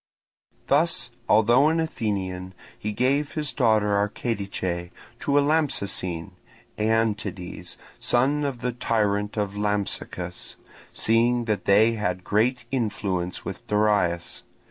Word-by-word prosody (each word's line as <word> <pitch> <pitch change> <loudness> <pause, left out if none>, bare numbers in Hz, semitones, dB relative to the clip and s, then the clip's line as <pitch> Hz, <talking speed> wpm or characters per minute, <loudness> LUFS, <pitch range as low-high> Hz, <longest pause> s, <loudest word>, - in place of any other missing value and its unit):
Thus, - - +2 0.2
although 120 +7 +5
an 160 +1 +2
Athenian, 95 - -3 0.2
he 105 - -3
gave 135 +6 +1
his 150 -3 -3
daughter, 110 -6 +3
Archedice, 100 -4 -2 0.3
to 140 0 +1
a - - +6
Lampsacene, 100 - 0 0.5
Aeantides, 105 -4 -1 0.2
son 140 +5 +2
of 135 -4 -3
the 125 - 0
tyrant 105 -3 0
of 100 -1 -1
Lampsacus, 105 -1 -3 0.4
seeing 120 +2 +2
that 105 -2 -1
they 105 +3 +5
had 90 -5 -2
great 115 +5 +1
influence 100 -7 -2
with - - -7
Darius. 105 -5 +1
105 Hz, 110 wpm, -25 LUFS, 100-120 Hz, 0.5 s, a